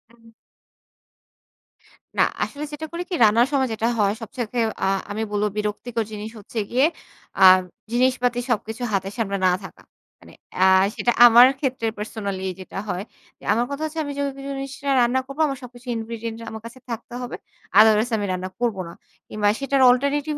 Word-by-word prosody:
উম 230 -1 -20 1.9
না - - +6 0.2
আসলে 290 +1 -5
যেটা 300 +1 -5
করি 340 +1 -4
কি 365 - -1
রান্নার 225 +3 +5
সময় 265 -2 +2
যেটা 220 +1 -1
হয় 200 -1 +3
সব 225 - -7
থেকে 240 0 -2 0.3
আ - - +2 0.2
আমি 215 +2 -2
বলবো 210 0 +1
বিরক্তিকর 215 +2 -2
জিনিস 215 +1 -6
হচ্ছে 215 +2 -6
গিয়ে 260 +4 +4 0.6
আ - - +9 0.5
জিনিসপাতি 245 0 +1
সবকিছু 225 0 -2
হাতের 195 0 -1
সামনে 200 -4 -1
না 185 - +5
থাকা। - - -13 0.4
মানে - - -16 0.2
অ্যা 185 - +5 0.3
সেটা 240 - +1
আমার 240 +1 +9
ক্ষেত্রে 260 -4 -1
পার্সোনালি 200 -3 -4
যেটা 185 +1 -7
হয়। 180 +1 -2 0.5
আমার 235 +3 +1
কথা 280 +2 -4
হচ্ছে 315 +1 -5
আমি 285 - -5
যেই 285 - 0 0.2
জিনিসটা 275 0 -5
রান্না 245 +2 +2
করবো 275 +3 -4
আমার 275 -2 -3
সবকিছু 245 +1 -12
ingredient 225 0 -5
আমার 220 0 -7
কাছে 235 +3 -10
থাকতে 230 0 -6
হবে। 245 - -5 0.4
otherwise 220 +2 +5
আমি 205 - -2
রান্না 185 0 -3
করব 235 -4 0
না। 170 - -9 0.4
কিংবা 210 -1 0
সেটার 275 0 +1
alternative 280 +4 +1
235 Hz, 170 wpm, -23 LUFS, 210-260 Hz, 1.9 s, আ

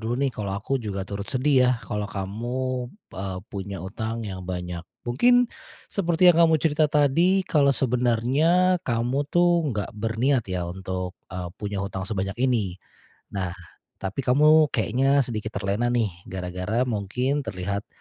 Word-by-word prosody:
dulu - - +1
nih 135 - +1
kalau 100 -2 -4
aku 130 +6 -2
juga 100 -4 -4
turut 100 +1 -6
sedih 135 +1 +2
ya, - - +5
kalau 105 -1 -3
kamu, 120 +6 -3 0.2
eee, 95 -1 -4
punya 100 -1 -5
utang 110 +3 -4
yang 95 -3 -5
banyak. 90 -1 -4 0.2
Mungkin 245 - +4 0.5
seperti 175 -2 +1
yang - - -3
kamu 160 -1 +6
cerita 155 0 +2
tadi, 165 +7 +3
kalau 145 -4 +3
sebenarnya 135 +9 +2
kamu 130 +1 -1
tuh 175 -2 +3
nggak 105 -2 -3
berniat 115 +2 0
ya 90 -1 -2
untuk, 90 0 -4 0.2
eee, 90 0 -4
punya 100 -1 -3
hutang 95 -1 -5
sebanyak 100 -2 -2
ini. 110 -8 0 0.5
Nah, 95 -3 -3 0.4
tapi 95 +6 -4
kamu 150 +5 +5
kayaknya 135 +4 +2
sedikit 110 -2 -5
terlena 100 +4 0
nih 120 -4 +1 0.2
gara-gara 90 +5 -2
mungkin 125 +4 -1
terlihat, 100 -3 -4
115 Hz, 145 wpm, -25 LUFS, 100-140 Hz, 0.5 s, kamu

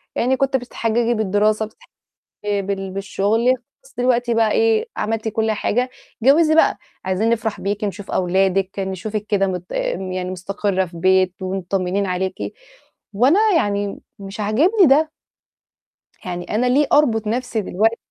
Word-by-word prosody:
يعني 260 +2 +1
كنتِ 270 -1 +1
بتتحججي 235 -1 -1
بالدراسة 215 0 +1
وبتتح 215 - -18 0.6
آآ، 205 -1 0
بال 195 -1 -4
بالشُغل 200 +4 0 0.4
خلاص - - -21
دلوقتي 245 -1 +1
بقى 225 -1 +2
إيه، 450 -1 +2
عملتِ 220 +1 -2
كل 220 0 0
حاجة 245 +4 0 0.3
اتجوّزي 310 +4 +5
بقى 325 - +4 0.3
عايزين 190 +4 +1
نفرح 225 -2 -1
بيكِ 205 +2 -2
نشوف 205 0 -4
أولادِك 190 +1 +1
نشوفِك 195 +2 -3
كده 195 -2 +2
مد 180 -2 -3
آمم، 185 0 -2
يعني 185 0 -3
مستقرّة 190 +1 -1
في 170 -1 -12
بيت 185 +1 +3
ومطمّنين 190 +1 -1
عليكِ 185 0 -2 0.8
وأنا 260 - +4 0.2
يعني 205 -6 0
م - - -7 0.2
مش 195 +1 -9
عاجبني 310 - +3
ده. 305 +3 +4 1.1
يعني 175 -1 -4
أنا 240 +4 +2
ليه 275 +4 +3
أربط 230 -7 +3
نَفْسي 240 0 -1
دلوقتـي 220 +5 +1
210 Hz, 145 wpm, -20 LUFS, 190-240 Hz, 1.1 s, اتجوّزي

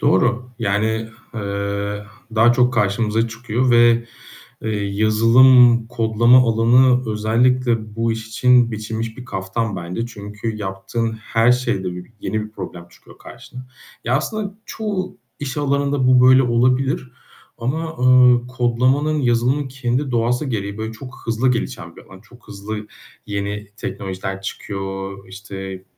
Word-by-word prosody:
Doğru. 120 +5 +1
Yani, 110 +1 -1 0.3
eee, 100 -1 -3 0.3
daha 115 +2 +5
çok 125 +1 +2
karşımıza 110 +1 +1
çıkıyor 120 +2 -1
ve, 120 0 +5 0.6
eee, 110 - -2
yazılım 115 +4 +5
kodlama 115 +1 +4
alanı 125 +1 +3
özellikle 115 0 +1
bu 115 0 0
iş 110 0 -6
için 125 +1 +3
biçilmiş 110 +1 -5
bir 125 - -9
kaftan 100 0 -3
bence. 90 +6 -4
Çünkü 105 0 -6
yaptığın 105 +3 -3
her 115 +2 +2
şeyde 95 -8 -2
bir, 90 0 -8
yeni 110 - -2
bir 110 - -11
problem 90 -4 -8
çıkıyor - - -19
karşına. 125 +1 -12 0.4
Ya, 120 +2 +2
aslında 200 +6 -3
çoğu 205 -4 -4 0.2
iş 140 -1 -5
alanında 140 -2 0
bu 125 0 +6
böyle 130 +1 +6
olabilir. 125 +2 +1 0.5
Ama, 160 +7 -3
ııı, 125 -1 +5
kodlamanın, 130 +5 +1
yazılımın 125 +3 +1
kendi 130 +1 -2
doğası 120 +3 0
gereği 100 -4 -4
böyle 110 +1 -4
çok 125 +4 -10
hızlı 115 +3 +1
gelişen 120 - -4
bir - - -12
alan, 95 -1 -15
çok 120 +2 -20
hızlı 105 +1 -6 0.4
yeni 100 0 -4
teknolojiler 95 -2 -5
çıkıyor. 95 0 -5
İşte, 95 -1 -8
115 Hz, 130 wpm, -20 LUFS, 105-125 Hz, 0.6 s, bu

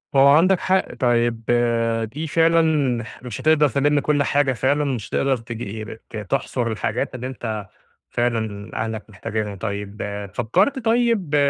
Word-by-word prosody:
هو 135 0 +7
عندك 170 +6 +5
حق، 190 0 +1
طيب 120 -2 +1 0.7
دي 155 +3 -4
فعلًا 165 +1 +4 0.6
مش 120 -3 -6
هتقدَر 155 -2 +4
تلِم 145 +2 +2
كلّ 145 0 +1
حاجة 140 -2 +2
فعلًا، 140 +4 +1
مش 130 -7 -3
هتقدَر 135 -2 +1
تجي 110 -2 -6
ب 110 0 -9
ت - - -7
تحصُر 110 +4 -2
الحاجات 110 +3 -2
اللي 125 0 -4
أنت 110 -5 -5 0.4
فعلًا 110 -4 -2
أهلك 110 0 -4
محتاجينها. 105 +1 -4
طيب 100 +1 -5 0.3
فكّرت 185 - +1
طيب 225 -9 +2
125 Hz, 140 wpm, -22 LUFS, 110-150 Hz, 0.7 s, هو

